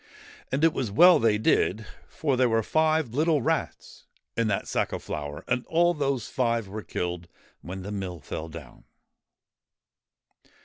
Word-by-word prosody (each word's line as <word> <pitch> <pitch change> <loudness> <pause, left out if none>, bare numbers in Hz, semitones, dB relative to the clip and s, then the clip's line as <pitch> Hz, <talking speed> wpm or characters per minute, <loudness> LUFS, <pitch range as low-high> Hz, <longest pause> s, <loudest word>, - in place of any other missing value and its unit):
And 140 +4 0
it 165 -1 +5
was 125 -5 -2
well 170 - +7
they 110 -4 +3
did, 110 0 +1 0.2
for 145 -4 -1
there 125 -1 +3
were 115 0 +2
five 155 -3 +1
little 155 -1 +2
rats - - -3 0.3
in 115 -1 +1
that 100 -2 -1
sack - - -1
of - - -5
flour, 75 0 -5
and 125 0 0
all 175 +1 +3
those 140 -6 -1
five 115 -4 0
were 105 +3 -6
killed 90 -3 -4 0.3
when 95 +1 -7
the 100 - -6
mill 95 -4 -5
fell 80 +1 -6
down. 80 0 -11
115 Hz, 160 wpm, -26 LUFS, 95-145 Hz, 0.3 s, well